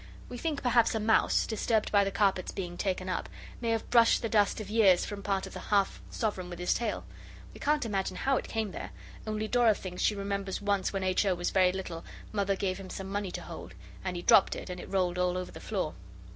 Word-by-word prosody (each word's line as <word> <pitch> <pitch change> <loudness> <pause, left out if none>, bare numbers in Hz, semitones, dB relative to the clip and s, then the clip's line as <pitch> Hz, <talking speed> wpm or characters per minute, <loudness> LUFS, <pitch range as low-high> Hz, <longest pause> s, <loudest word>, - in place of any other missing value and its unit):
We 245 - -6
think 310 -1 -2
perhaps 240 -2 +3
a - - +1
mouse, 220 +1 +3
disturbed 220 0 0
by 205 -1 +5
the 195 - 0
carpets 195 -2 +1
being 175 -2 -5
taken 185 0 -2
up, 185 - -2 0.3
may 230 - -1
have 225 -1 0
brushed 235 0 +5
the 230 - 0
dust 210 -1 +3
of 215 - -6
years 205 -4 +4
from 205 -1 -6
part 195 -1 -1
of - - -10
the - - -6
half 200 -2 +1
sovereign 190 -5 -2
with 175 - -7
his 180 +1 +1
tail. 230 -3 -2 0.5
We - - -12
can't 295 -2 +1
imagine 195 -4 -1
how 270 0 +2
it - - -4
came 220 -3 -2
there, - - -7 0.3
only 215 0 -2
Dora 235 -2 +4
thinks 180 -2 -6
she 210 - +3
remembers 200 -1 -3
once 205 -1 0
when 195 -1 -2
H. 185 +1 +2
O. 185 - +3
was 175 0 -2
very 185 -2 +4
little 180 -3 -5 0.3
Mother 200 -2 +1
gave 190 -1 -2
him 190 -1 -9
some 190 0 -6
money 200 -1 -2
to - - -5
hold, 90 - -9 0.3
and 185 -1 -3
he 175 - -4
dropped 195 - +6
it, - - -6
and 180 - -6
it - - -9
rolled 180 -2 0
all 180 0 +1
over 185 - -4
the - - -10
floor. 190 -8 -2
195 Hz, 240 wpm, -30 LUFS, 185-215 Hz, 0.5 s, dropped